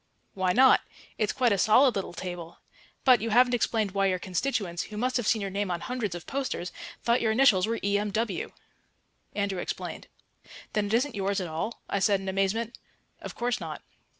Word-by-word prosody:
"Why 185 -1 +1
not? 260 +7 +6 0.4
It's 215 -1 +1
quite 250 -3 +2
a 200 - +2
solid 245 +6 +5
little 195 -3 -3
table. 175 -2 -6 0.5
But 255 -3 +6
you 225 - -2
haven't 245 +3 +5
explained 225 -3 +1
why 195 0 +2
your 185 -1 +1
constituents, 185 -1 -2
who 210 - -9
must 255 +3 0
have 240 -4 0
seen 220 -3 +2
your 195 - -3
name 200 0 -2
on 175 -1 -1
hundreds 235 -8 -3
of 175 - -8
posters, 265 -10 -3 0.3
thought 235 +1 +2
your 220 - +2
initials 220 -5 +4
were 230 +1 -1
E.M.W." 205 0 -1 0.8
Andrew 200 -2 -1
explained. - - -5 0.7
"Then 210 -1 +1
it 205 - -3
isn't 260 +3 +1
yours 200 0 -1
at 185 - -3
all?" 165 +8 -4
I 200 - -1
said 200 0 +3
in 190 - -8
amazement. 195 +5 -1 0.4
"Of - - -7
course 240 0 -1
not." - - -7
205 Hz, 190 wpm, -28 LUFS, 190-235 Hz, 0.8 s, not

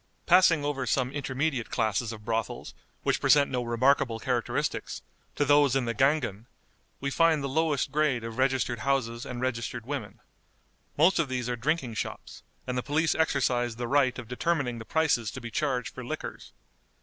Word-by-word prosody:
Passing 175 -4 +5
over 135 -3 -2
some 130 +2 +1
intermediate 140 -2 -2
classes 110 0 0
of 105 -2 -10
brothels, 115 -1 -3 0.3
which - - +1
present 145 -1 +4
no 125 -2 0
remarkable 120 0 +2
characteristics, 120 -1 -2 0.3
to 145 - +1
those 145 -2 +4
in 135 -2 +1
the 115 - -1
Gangen, 125 -4 +1 0.5
we 140 0 -2
find 165 -1 +3
the - - -1
lowest 145 -1 0
grade 140 -5 +1
of 115 +2 -6
registered 130 -3 +1
houses 120 -2 -1
and 125 -1 -5
registered 115 -2 -3
women. 130 -7 -5 0.8
Most 165 +5 +4
of 155 -5 +1
these 125 -2 -2
are 125 - -1
drinking 130 0 -1
shops, - - -6 0.2
and 125 - -3
the 125 - 0
police 150 +3 +1
exercise 125 -6 +1
the 120 +1 -4
right 135 -1 +2
of 125 -3 -7
determining 130 -2 -1
the 110 - -8
prices 145 -5 +1
to 130 - -7
be 120 -1 -8
charged 130 -1 -1
for - - -7
liquors. - - -6
130 Hz, 175 wpm, -28 LUFS, 120-145 Hz, 0.8 s, Passing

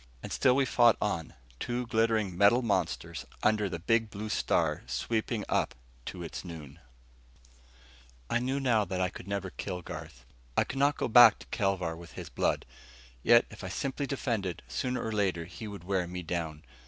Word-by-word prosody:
And - - -5
still 125 - +4
we 135 0 +3
fought 120 -3 +5
on, 85 -7 -2 0.2
two 125 0 -2
glittering 110 -4 +1
metal 100 +7 +5
monsters 90 - -1 0.2
under 105 -2 +3
the 85 - -3
big 110 +6 +1
blue 105 +2 -6
star - - +1
sweeping 110 -1 -1
up - - 0 0.3
to 90 - -5
its 85 - -6
noon. 80 -6 -9 1.5
I 120 - +1
knew 130 +3 -1
now 120 -6 +3
that 95 -1 -3
I 90 0 +1
could 95 - -11
never 100 -2 -3
kill 90 -1 -5
Garth. - - -9 0.3
I - - +6
could 135 - -5
not 145 +1 +3
go - - 0
back 120 -2 +9
to - - -14
Kelvar 95 -4 0
with 85 0 -12
his - - -7
blood. - - 0 0.6
Yet 120 - +6
if 105 - -10
I 95 - -4
simply 135 +7 -2
defended, 110 - -2
sooner 125 -1 -2
or 110 - -2
later 95 -6 0
he 85 +5 -8
would 100 -4 -8
wear 90 -1 0
me 90 0 -5
down. 80 -2 -3
100 Hz, 180 wpm, -30 LUFS, 90-120 Hz, 1.5 s, back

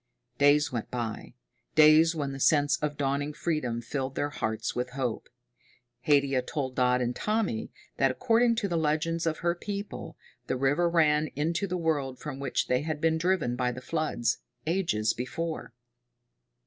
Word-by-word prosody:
Days 145 +1 +4
went 115 -3 -4
by, 120 -1 -5 0.4
days 155 +2 +6
when 145 -3 -2
the 135 - -7
sense 145 0 +4
of 150 -1 -3
dawning 145 +1 -1
freedom 130 -9 -2
filled 135 +2 -3
their 145 0 -1
hearts 110 -5 -2
with 125 0 -3
hope. 125 -4 -2 0.8
Haidia 140 -3 +3
told 130 0 -3
Dodd 125 0 +3
and 120 0 -1
Tommy 210 - -1 0.3
that, 135 - +3
according 230 - +2
to 220 -3 -1
the 170 -3 0
legends 160 +2 0
of 160 - 0
her 170 - +3
people, 200 +3 -6 0.3
the 130 - -1
river 145 +7 +2
ran 155 -2 +3
into 165 +7 0
the 180 0 -2
world 145 -6 -1
from 145 -3 -7
which 140 - -1
they 125 +1 +1
had 155 0 -3
been 160 0 +2
driven 170 -8 +1
by 125 0 0
the 125 - -7
floods, 150 -4 -1 0.3
ages 160 - +1
before. 160 +6 -4
145 Hz, 160 wpm, -28 LUFS, 130-165 Hz, 0.8 s, days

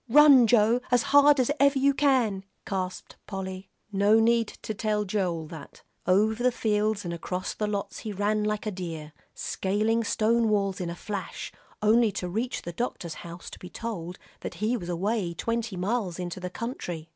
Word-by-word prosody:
"Run, 275 -2 +8
Joe, 230 +2 +4
as 245 -1 +3
hard 285 0 +7
as 255 +2 +2
ever 280 0 +5
you 275 +1 +4
can," 255 -9 +2 0.2
gasped 185 -2 -4
Polly. 190 -1 -6 0.2
No 205 +2 +4
need 230 0 +3 0.2
to 220 - -3
tell 210 0 -1
Joel 185 -5 -1
that. 160 - -11 0.2
Over 215 +5 +3
the 250 - +4
fields 215 -3 0
and 170 - -3
across 180 +2 -4
lots 210 -1 -2
he 215 - -5
ran 210 +2 0
like 210 0 -1
a 215 - -1
deer, 165 -5 -6 0.2
scaling 215 +4 0
stone 225 +1 +2
walls 200 -2 0
in 175 - -2
a 170 - -5
flash, 200 0 -5 0.3
only 220 +1 +5
to 180 -1 -3
reach 225 +8 -2
the 175 - -6
doctor's 175 -5 -3
house 170 0 -9
to - - -10
be 180 - -9
told 180 -5 -5 0.2
that - - -6
he 220 +4 0
was 175 -7 -5
away 180 0 -1
twenty 230 -1 -2
miles 195 -1 -1
into 180 -1 -5
the 180 0 -4
country. 180 -7 -5
210 Hz, 180 wpm, -27 LUFS, 185-230 Hz, 0.3 s, Run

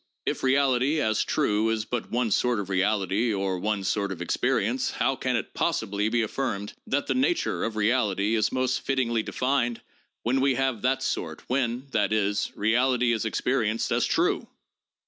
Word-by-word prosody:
"If - - -1
reality 135 +2 +2
as 110 -6 +1
true 105 +2 +1
is 110 -1 -1
but 120 -1 -4
one 120 -2 0
sort 120 +2 +2
of 100 -1 -5
reality 100 +3 +1
or 95 -2 -1
one 105 0 -1
sort 100 0 -1
of 90 - -6
experience, 90 - 0
how - - 0
can - - -1
it - - -3
possibly 105 +2 0
be 120 0 +1
affirmed 110 -3 -3
that 140 +1 0
the - - 0
nature 270 +7 0
of 110 - -2
reality 105 -2 +1
is 110 -2 +2
most 130 0 0
fittingly 120 -4 0
defined, 125 0 -1 0.4
when 130 +3 +1
we 135 -1 +3
have 130 -5 0
that 130 +1 +1
sort, 80 -9 -3
when, 125 0 -1
that 105 -3 +1
is, 105 -1 0
reality 125 +3 +2
is 115 -1 0
experienced 115 -1 0
as - - +2
true?" - - +1
115 Hz, 170 wpm, -26 LUFS, 105-130 Hz, 0.4 s, we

